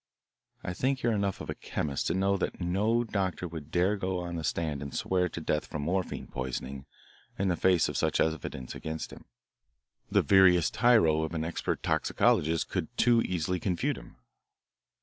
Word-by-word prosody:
I 90 - -3
think 130 +7 -1
you 120 - +3
are - - +1
enough 100 -2 -1
of - - -8
a - - -1
chemist 70 -3 -3
to 85 - 0
know 100 +1 +2
that 95 - -3
no 105 +7 +1
doctor 95 -5 -2
would 80 -3 -8
dare 90 +5 +2
go 95 -1 -2
on 85 -1 -4
the 80 - -4
stand 75 -3 -1
and 70 -1 -6
swear 90 -1 +1
to - - -6
death 75 -1 -1
from 75 - -4
morphine 90 +4 -2
poisoning 65 +1 -5 0.5
in 100 0 +1
the 90 - +2
face 90 -1 +3
of - - -5
such - - +1
evidence 75 -5 -2
against 80 0 -5
him. - - -13 0.8
The - - +3
veriest 90 -4 +5
tyro 110 -11 +4
of 80 +1 -3
an 80 0 -1
expert 85 - -3
toxicologist 80 +1 +2
could - - -2
too 120 -1 +5
easily 90 -1 -1
confute 90 -3 0
him." - - -15
90 Hz, 185 wpm, -29 LUFS, 80-95 Hz, 0.8 s, veriest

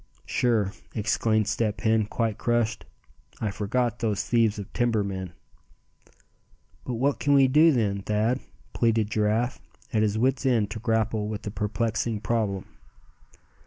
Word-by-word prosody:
"Sure!" 110 -6 +1 0.2
exclaimed 110 0 +1
Step 105 -1 -1
Hen, 110 -1 +2
quite 110 -1 -2
crushed. 120 -1 0 0.5
"I 105 - -1
forgot 120 +4 -1
those 110 -4 0
thieves 115 -3 +2
of 100 -2 -8
timber 115 -4 +1
men." 95 -3 -5 1.5
"But 125 - -4
what 135 +4 0
can 145 0 +3
we 135 -1 +6
do, 155 +5 +6
then, 105 -7 0
Thad;" 110 +5 0 0.3
pleaded 115 -2 +1
Giraffe, 110 +4 0 0.3
at 110 - +2
his 110 0 +1
wits' 130 +3 +1
ends 115 -6 +2
to 110 +2 -6
grapple 110 -1 0
with 105 -1 -5
the 105 - -4
perplexing 110 +1 -1
problem. 105 -3 -1
110 Hz, 140 wpm, -26 LUFS, 105-120 Hz, 1.5 s, we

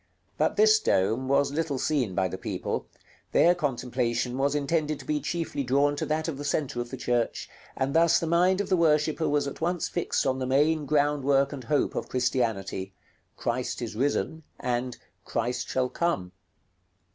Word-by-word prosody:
But 155 - +1
this 215 +1 +6
dome 115 - +1
was 140 +1 +2
little 155 -2 -1
seen 130 -9 0
by 95 -1 +2
the - - -5
people; - - -3 0.5
their 175 - +6
contemplation 125 -5 -1
was 140 +2 +1
intended 150 +1 0
to - - -12
be 150 -1 0
chiefly 155 -2 -2
drawn 140 +3 +2
to - - -2
that 155 +1 -1
of 145 -4 -4
the - - -4
centre 145 -4 -1
of 120 - -6
the 130 - -6
church, 120 -1 -1 0.3
and 135 +1 0
thus 165 0 +5
the - - -2
mind 180 +4 +3
of 205 - -5
the 185 - +4
worshipper 155 -1 +2
was 145 -1 +1
at 140 - -6
once 175 0 0
fixed 175 - -1
on 130 -1 0
the 130 - -2
main 150 +3 +2
groundwork 145 -1 +2
and 130 -4 -7
hope 145 +4 +1
of - - -4
Christianity, 115 -7 -1 0.4
"Christ - - -2
is - - -5
risen," 145 +5 -1 0.2
and 125 0 -2 0.3
"Christ 120 +2 -2
shall 130 -1 +1
come." 110 - -1
140 Hz, 180 wpm, -27 LUFS, 125-155 Hz, 0.5 s, this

